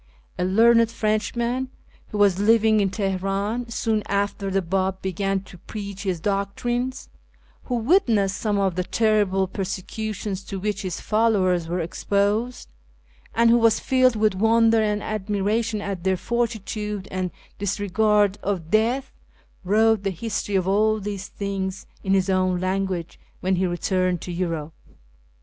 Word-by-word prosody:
A -, -, +1 dB
learned 230 Hz, +4 st, +5 dB
Frenchman 235 Hz, +3 st, -1 dB, 0.4 s
who 210 Hz, -, -5 dB
was 200 Hz, -2 st, +4 dB
living 220 Hz, +1 st, +4 dB
in 200 Hz, -1 st, +2 dB
Tehenin 195 Hz, +4 st, -2 dB
soon 220 Hz, -1 st, 0 dB
after 200 Hz, 0 st, -1 dB
the 195 Hz, 0 st, 0 dB
B;ib 190 Hz, +2 st, -1 dB
began 195 Hz, +1 st, -1 dB
to 185 Hz, -2 st, -14 dB
preach 200 Hz, -1 st, -7 dB
his 185 Hz, -4 st, -2 dB
doctrines, 240 Hz, +7 st, -2 dB, 0.6 s
who 250 Hz, -, -2 dB
witnessed 225 Hz, -, +2 dB
some 210 Hz, -2 st, 0 dB
of 195 Hz, -2 st, +1 dB
the 180 Hz, +1 st, -1 dB
terrible 205 Hz, -2 st, +2 dB
persecutions 195 Hz, +1 st, -4 dB
to 195 Hz, -, -5 dB
which 205 Hz, 0 st, -2 dB
his 185 Hz, -4 st, -4 dB
followers 195 Hz, -6 st, +2 dB
were 175 Hz, +1 st, -1 dB
exposed, 205 Hz, +8 st, -1 dB, 0.7 s
and 230 Hz, 0 st, +5 dB
who 240 Hz, -, +5 dB
was 230 Hz, -1 st, +4 dB
filled 255 Hz, -2 st, +3 dB
with 215 Hz, -1 st, +2 dB
wonder 225 Hz, +3 st, +4 dB
and 210 Hz, -1 st, 0 dB
admiration 215 Hz, +2 st, -1 dB
at 195 Hz, -3 st, -4 dB
their 190 Hz, 0 st, +1 dB
fortitude 215 Hz, -2 st, -3 dB
and 185 Hz, -1 st, -2 dB, 0.3 s
dis 200 Hz, 0 st, -1 dB
regard 205 Hz, 0 st, +2 dB
of 180 Hz, -5 st, -3 dB
death, 240 Hz, +5 st, +1 dB, 0.5 s
wrote 220 Hz, +2 st, +3 dB
the 200 Hz, -, -1 dB
history 205 Hz, +1 st, -3 dB
of 185 Hz, -1 st, +1 dB
all 215 Hz, +2 st, +2 dB
these 200 Hz, -1 st, -5 dB
things 195 Hz, -1 st, -4 dB, 0.2 s
in 195 Hz, 0 st, +2 dB
his 190 Hz, 0 st, +2 dB
own 185 Hz, -1 st, +1 dB
language 185 Hz, -2 st, -2 dB, 0.2 s
when 190 Hz, +1 st, +1 dB
he 185 Hz, +1 st, +1 dB
returned 180 Hz, 0 st, 0 dB
to 180 Hz, -, -6 dB
Europe. 165 Hz, -3 st, -3 dB
200 Hz, 145 wpm, -24 LUFS, 190-220 Hz, 0.7 s, learned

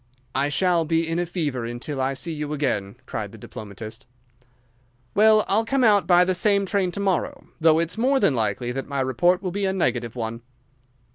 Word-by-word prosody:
"I 140 Hz, +2 st, +1 dB
shall 170 Hz, +3 st, +2 dB
be 165 Hz, +1 st, 0 dB
in 165 Hz, +1 st, -1 dB
a 175 Hz, -, -1 dB
fever 150 Hz, -8 st, -2 dB
until 120 Hz, +4 st, -4 dB
I 135 Hz, +1 st, 0 dB
see 165 Hz, +5 st, -2 dB
you 150 Hz, -1 st, -4 dB
again," 105 Hz, -9 st, -2 dB
cried -, -, -5 dB
the -, -, -12 dB
diplomatist. 110 Hz, +3 st, -9 dB, 1.1 s
"Well, 215 Hz, 0 st, +5 dB
I'll 215 Hz, +3 st, +3 dB
come 265 Hz, +3 st, 0 dB
out 205 Hz, -6 st, +4 dB
by 180 Hz, 0 st, +5 dB
the 185 Hz, -, +1 dB
same 200 Hz, +2 st, +3 dB
train 190 Hz, -2 st, 0 dB
to -, -, -4 dB
morrow, 195 Hz, -2 st, -2 dB
though 160 Hz, -1 st, +5 dB
it's 170 Hz, +5 st, -1 dB
more 265 Hz, +3 st, +3 dB
than 150 Hz, -, +3 dB
likely 115 Hz, +1 st, -1 dB
that 135 Hz, +2 st, -5 dB
my 140 Hz, -1 st, -2 dB
report 175 Hz, +9 st, +2 dB
will 185 Hz, -, -2 dB
be 200 Hz, +2 st, -2 dB
a 190 Hz, -, 0 dB
negative 120 Hz, -, -1 dB
one." 115 Hz, -1 st, -4 dB
165 Hz, 200 wpm, -23 LUFS, 130-190 Hz, 1.1 s, Well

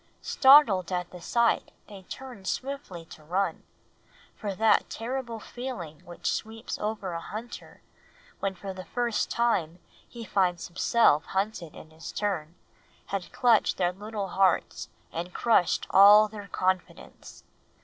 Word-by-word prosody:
Startled 245 Hz, -, +6 dB
at 180 Hz, -1 st, -2 dB
the 180 Hz, -, -11 dB
sight, 235 Hz, +6 st, +1 dB, 0.2 s
they 200 Hz, -3 st, -11 dB
turned 235 Hz, 0 st, -10 dB
swiftly 260 Hz, -, -4 dB
to 155 Hz, -, -14 dB
run; 185 Hz, +6 st, -1 dB, 0.7 s
for 200 Hz, -2 st, -5 dB
that 220 Hz, +2 st, +3 dB
terrible 235 Hz, -1 st, -4 dB
feeling 225 Hz, -, -7 dB
which 175 Hz, 0 st, -13 dB
sweeps 225 Hz, +1 st, -5 dB
over 210 Hz, -4 st, -3 dB
a 165 Hz, -, -3 dB
hunter, 220 Hz, +7 st, -9 dB, 0.6 s
when 195 Hz, -1 st, -2 dB
for 195 Hz, +1 st, -7 dB
the 185 Hz, -1 st, -9 dB
first 240 Hz, +3 st, -1 dB
time 185 Hz, -9 st, 0 dB, 0.3 s
he 235 Hz, -2 st, -9 dB
finds 180 Hz, -4 st, 0 dB
himself 175 Hz, -3 st, +3 dB
hunted 190 Hz, -4 st, -3 dB
in 160 Hz, -, -13 dB
his 160 Hz, +1 st, -9 dB
turn, 175 Hz, -6 st, -3 dB, 0.5 s
had 195 Hz, -2 st, -4 dB
clutched 235 Hz, -3 st, +3 dB
their 180 Hz, -1 st, +1 dB
little 205 Hz, 0 st, -5 dB
hearts 190 Hz, 0 st, +1 dB, 0.2 s
and 175 Hz, +2 st, -6 dB
crushed 220 Hz, -7 st, +2 dB
all 205 Hz, +2 st, +8 dB
their 205 Hz, -1 st, -9 dB
confidence. 185 Hz, -1 st, -3 dB
200 Hz, 135 wpm, -27 LUFS, 180-225 Hz, 0.7 s, all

